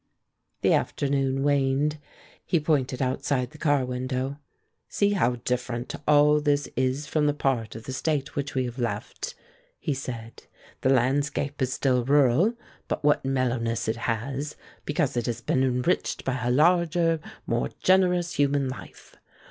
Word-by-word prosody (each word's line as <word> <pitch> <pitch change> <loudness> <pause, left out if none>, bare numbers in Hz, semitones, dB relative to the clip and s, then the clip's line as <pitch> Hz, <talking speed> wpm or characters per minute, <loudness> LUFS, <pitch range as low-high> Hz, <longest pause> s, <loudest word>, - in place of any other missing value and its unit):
The - - +4
afternoon 135 -1 0
waned. 145 +1 +1 0.4
He 170 - +1
pointed 140 -4 0
outside 130 0 -1
the 155 - -14
car 145 -4 +2
window. 130 +2 -3 0.5
"See 205 0 +2
how 125 -12 +2
different 125 -1 -2
all 150 0 +5
this 145 -1 +1
is 130 +3 0
from 150 0 +1
the 145 - +1
part 125 -7 -1
of 110 - -8
the 130 - -6
State 145 +1 -1
which 140 0 -3
we 130 -1 +1
have 120 +1 -6
left," 105 -4 -4 0.4
he 145 - -2
said. 120 -4 -7 0.4
"The 130 - +2
landscape 140 +2 +1
is 130 -1 +1
still 130 -2 +1
rural, 145 - +4 0.3
but - - -3
what 145 0 +3
mellowness 125 -4 0
it 110 +1 0
has; 130 +6 -3 0.3
because 150 -3 0
it 120 0 -1
has 120 -1 -2
been 130 - 0
enriched 125 -1 0
by 130 -1 -1
a 120 - 0
larger, 165 +3 +3 0.3
more 65 - 0
generous 180 -2 +3
human 140 -1 +2
life. 130 - -10
135 Hz, 150 wpm, -26 LUFS, 125-145 Hz, 0.5 s, all